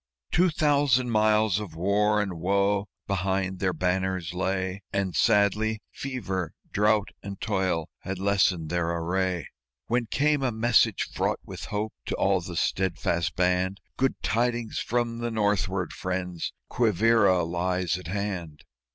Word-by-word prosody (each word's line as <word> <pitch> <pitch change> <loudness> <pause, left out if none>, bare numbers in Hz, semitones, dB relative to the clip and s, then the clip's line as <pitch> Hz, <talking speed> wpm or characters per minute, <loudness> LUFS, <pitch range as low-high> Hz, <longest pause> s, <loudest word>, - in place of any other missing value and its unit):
Two 180 +1 +4
thousand 145 -6 +2
miles 110 -2 +3
of 100 -7 -7
war 105 +4 +2
and 90 -4 -5
woe 100 +3 +1 0.2
behind 95 -1 -1
their 95 0 +1
banners 90 0 -1
lay: 95 +1 -2
And 95 -4 -1
sadly 105 +4 +3
fever, 95 - -4 0.2
drought 105 0 +2
and 100 -1 -7
toil 95 -6 0
had 95 0 -5
lessened 95 -4 +2
their 85 -1 0
array, 90 -1 -1 0.4
When 120 0 0
came 145 +3 +2
a 130 -2 +1
message 115 +1 +3
fraught - - 0
with - - -7
hope 105 +1 -3
to - - -1
all 95 -1 +2
the 85 0 -7
steadfast 85 -5 0
band: 90 +2 +1 0.2
"Good 135 0 0
tidings 120 0 0
from 120 -1 -1
the 120 0 -2
northward, 100 -5 0
friends! 90 -2 -3 0.2
Quivíra 110 -5 +3
lies 90 0 0
at 90 -2 -7
hand!" 90 -6 -4
95 Hz, 135 wpm, -27 LUFS, 90-110 Hz, 0.4 s, Two